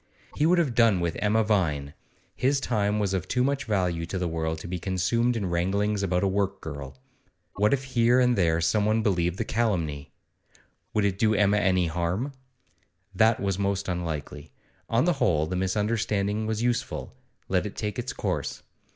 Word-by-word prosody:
He 150 - +2
would 180 +2 +4
have 155 -8 +1
done 115 -5 +4
with 85 -1 -1
Emma 110 +2 +2
Vine; 80 -10 0 0.4
his 135 +2 +1
time 105 -5 0
was 100 -2 0
of 95 -1 -2
too 125 - +1
much 140 +1 0
value 90 -6 0
to 95 - -3
the 90 -1 -1
world 80 -1 -2
to 80 - -8
be 90 +1 -4
consumed 95 +7 0
in 105 - -2
wranglings 100 +4 0
about 90 -1 0
a - - +3
work 100 0 -1
girl. 70 -5 -7 0.6
What 105 +1 +3
if 135 -1 +1
here 125 -1 +3
and 125 -1 +3
there 85 -4 +2
someone 110 +5 +2
believed 90 -4 +1
the 115 - -2
calumny? 85 -12 -1 0.8
Would 105 -1 +2
it 100 -1 -1
do 110 -1 +3
Emma 105 +1 +3
any 95 -3 +2
harm? 90 - -2 0.8
That 110 +4 +3
was 100 -1 -1
most 100 0 -1
unlikely. 80 -4 -4 0.4
On 115 +6 +2
the 175 - +3
whole, 80 - +1
the 90 - -4
misunderstanding 105 +2 0
was 110 +1 -1
useful; 120 -1 -2 0.3
let 95 +1 +1
it 100 - -9
take 105 +2 -3
its 125 +1 -3
course. - - -3
100 Hz, 180 wpm, -26 LUFS, 90-110 Hz, 0.8 s, would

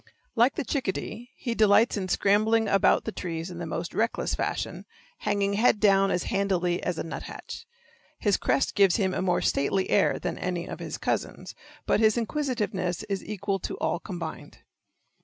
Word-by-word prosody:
Like 240 +3 +4
the 310 - -2
chickadee, 240 -2 -3
he 235 - -3
delights 220 +1 +4
in 195 -3 -2
scrambling 215 +4 +3
about 195 -1 +3
the 220 - -2
trees 165 -2 -5
in 170 - -8
the 170 - -4
most 165 +1 -4
reckless 230 +1 0
fashion, - - -3 0.3
hanging 200 -1 0
head 215 +1 +3
down 195 -2 +4
as 180 - 0
handily 180 -3 0
as 180 -2 -2
a - - -2
nuthatch. 165 - -8 0.5
His 205 -2 +2
crest 270 - +1
gives 195 -4 +4
him 190 -4 +1
a - - -1
more 180 -2 +1
stately 190 +7 0
air - - +3
than 180 - -4
any 180 -1 -2
of - - -7
his - - -5
cousins, - - -3 0.3
but - - +2
his 220 0 +4
inquisitiveness 215 - -1
is 195 -2 -2
equal 200 -1 -2
to - - -5
all 175 - -1
combined. 165 -6 -7
195 Hz, 175 wpm, -27 LUFS, 180-220 Hz, 0.5 s, Like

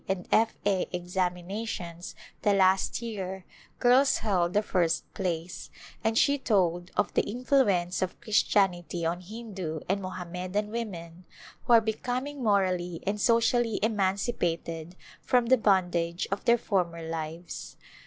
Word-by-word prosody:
and 190 -2 -2
F. 225 +1 +3
A. 195 -3 +1
examinations 180 0 -3 0.3
the 205 -1 +3
last 190 +4 +2
year 190 -4 -5 0.3
girls 260 +3 +4
held 185 -5 +1
the 210 - +2
first 170 -5 +1
place, 175 -2 -4 0.3
and 225 0 +1
she 285 +3 +4
told 175 -7 +1
of 210 - +1
the - - +3
in 250 +4 -6
fluence 195 -11 +2
of 185 -1 -2
Christianity 180 -6 +1
on 170 +2 -1
Hindu 190 -6 -6
and 195 +2 0
Mohammedan 185 +2 -4
women 180 -7 -6 0.4
who 240 - +4
are 230 - +8
becoming 250 +6 -3
morally 185 -5 +1
and 205 +1 -1
socially 230 -1 +2
emancipated 185 -5 -1 0.3
from 245 -2 +2
the 260 +2 +5
bondage 180 -5 +1
of 195 +5 -3
their 235 -1 +5
former 175 -7 -1
lives. 165 +1 -6
190 Hz, 135 wpm, -28 LUFS, 175-220 Hz, 0.4 s, are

